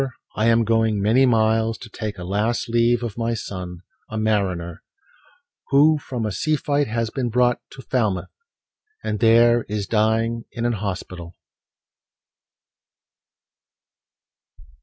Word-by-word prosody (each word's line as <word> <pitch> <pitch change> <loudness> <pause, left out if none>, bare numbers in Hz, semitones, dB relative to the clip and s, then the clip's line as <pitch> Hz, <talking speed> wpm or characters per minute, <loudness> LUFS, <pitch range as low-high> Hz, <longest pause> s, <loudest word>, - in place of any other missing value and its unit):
I 110 - +1
am 115 0 +4
going 110 -1 +1
many 115 +7 +4
miles 110 -1 +2
to 115 - -10
take 105 -1 -6
A 90 - -7
last 110 +7 -1
leave 120 +1 +2
of 115 -1 -5
my 115 0 0
son, 90 -5 -7 0.3
a 110 - -5
mariner, 95 -6 -1 0.9
Who 150 +3 +4
from 125 -5 -4
a 105 - -2
sea 155 +11 0
fight 145 -1 0
has 115 0 -2
been 125 -3 -2
brought 125 +1 +2
to 130 - -11
Falmouth, 105 -8 -1 0.7
And 105 -1 -2
there 115 +1 +5
is 105 -1 -2
dying 115 +2 0
in 120 - -4
an 120 - +1
hospital." 90 -4 -5
115 Hz, 130 wpm, -22 LUFS, 105-120 Hz, 0.9 s, there